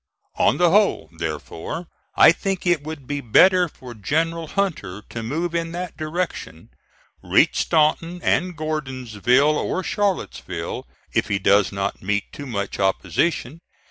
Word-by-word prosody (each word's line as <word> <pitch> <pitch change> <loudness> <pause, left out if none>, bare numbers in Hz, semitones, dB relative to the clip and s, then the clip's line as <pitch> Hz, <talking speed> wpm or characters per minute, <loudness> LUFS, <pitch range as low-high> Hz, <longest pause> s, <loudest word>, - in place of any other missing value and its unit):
On - - +4
the 175 -1 +4
whole, 200 - +2
therefore, 80 - -5 0.3
I - - +8
think 190 +1 -3
it 175 -5 +2
would 155 -3 -7
be 145 +2 -3
better 180 - +5
for 125 -4 -11
General 160 - -1
Hunter 150 - -2
to 115 - -5
move 160 +9 -2
in 165 0 -2
that 175 -1 -5
direction; 155 - -4 0.5
reach - - +3
Staunton 165 +2 +1
and 180 -2 +1
Gordonsville 135 -2 +1
or 185 - -2
Charlottesville, 205 -2 -2 0.3
if - - +1
he 105 -2 0
does 100 0 +3
not 100 0 -3
meet 105 +2 -2
too 145 - -7
much 100 -5 -4
opposition. 100 - 0
150 Hz, 140 wpm, -22 LUFS, 105-170 Hz, 0.5 s, I